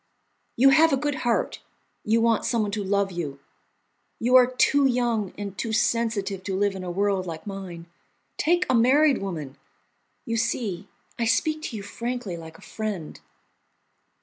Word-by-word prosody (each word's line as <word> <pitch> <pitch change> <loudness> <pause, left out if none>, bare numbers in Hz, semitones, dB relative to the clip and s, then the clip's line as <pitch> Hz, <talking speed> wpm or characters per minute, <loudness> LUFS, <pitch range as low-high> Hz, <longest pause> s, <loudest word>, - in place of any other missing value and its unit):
You 270 +3 +6
have 315 +4 +5
a 275 - +3
good 290 +2 -1
heart, 240 -5 -1 0.4
you 225 +2 +2
want 230 -1 +2
someone 225 -4 0
to 205 0 -2
love 200 0 0
you, 150 -6 -5 0.8
you 245 +3 +2
are 250 -1 +8
too 275 +2 +3
young 240 -6 0
and 200 -1 -6
too 225 - -3
sensitive 215 -3 0
to 190 -2 -2
live 200 0 +1
in 190 - -6
a 180 - -5
world 195 0 0
like 160 -1 -7
mine. 190 -4 -7 0.5
Take 350 +3 +2
a - - +1
married 265 +4 +4
woman. 155 -8 -5 0.7
You 230 -2 -1
see, 210 -5 -2 0.3
I 235 - +1
speak 310 +7 +1
to 225 - -5
you 200 - -7
frankly, 235 -1 -4
like 160 -1 -10
a - - -19
friend." 205 -8 -5
215 Hz, 165 wpm, -25 LUFS, 190-245 Hz, 0.8 s, are